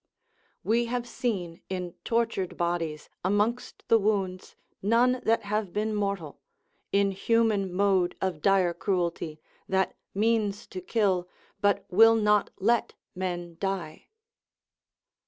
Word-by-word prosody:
["We 235 +2 +2
have 245 0 -3
seen 195 -10 -3
in 180 -2 -4
tortured 230 -5 -1
bodies, 170 -3 -2 0.2
amongst 210 +6 0
the 225 - +5
wounds, 195 -3 -1 0.3
none 245 +5 +3
that 225 +1 +2
have 205 -2 -2
been 215 +1 -1
mortal, 200 -7 -3 0.5
inhuman 200 0 +2
mode 190 -1 +2
of 185 -5 -2
dire 190 -2 +3
cruelty, 170 -4 -2 0.3
that 190 0 +1 0.2
means 215 0 +1
to 370 - -6
kill, 195 - +1 0.3
but 205 0 +2
will 225 +4 +7
not 210 -2 +3
let 230 +4 +1 0.2
men 175 -2 -4
die." 190 -5 -4
200 Hz, 115 wpm, -28 LUFS, 180-225 Hz, 0.5 s, will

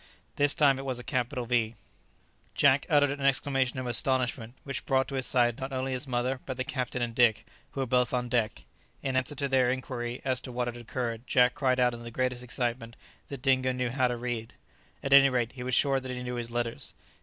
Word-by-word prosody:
This 145 0 +3
time 140 -3 +4
it - - -5
was 130 -2 -2
a 125 - -6
capital 125 0 -2
V. 115 -2 0 0.8
Jack 140 -1 +4
uttered 145 -3 +4
an 140 0 -5
exclamation 135 -1 +1
of 130 - -3
astonishment 125 -1 +1
which 135 -2 -4
brought 135 -1 +2
to - - -7
his 130 -2 +1
side 120 -2 +3
not 135 +1 -5
only 130 0 -2
his 130 +2 -2
mother, 125 +1 -1
but 130 -2 -4
the 130 - 0
captain 125 -1 -3
and 115 -1 -3
Dick, 115 -3 +3 0.3
who 135 - -3
were - - 0
both 125 -1 +2
on 125 -1 -1
deck. 115 -3 -1 0.4
In 135 -1 -2
answer 130 +3 0
to 140 0 -1
their 130 -2 +3
inquiry 125 -2 -4
as 130 -2 0
to 130 - -8
what 120 0 -2
had 120 - -4
occurred, 120 0 -4
Jack 125 -1 +4
cried 130 -2 +1
out 125 -1 +3
in 120 - -8
the 115 - -7
greatest 125 +1 -1
excitement 120 -1 -2 0.3
that 140 -2 -8
Dingo 130 -2 +3
knew 125 -1 -2
how 130 0 +2
to 120 -1 -3
read. 120 -2 -4 0.5
At 135 - +1
any 140 0 +8
rate 120 -2 0
he 125 - -10
was 125 0 0
sure 135 -2 +3
that 130 0 -8
he 125 0 -4
knew 125 0 -4
his 120 -1 -4
letters. 120 -1 -2
125 Hz, 230 wpm, -28 LUFS, 120-135 Hz, 0.8 s, any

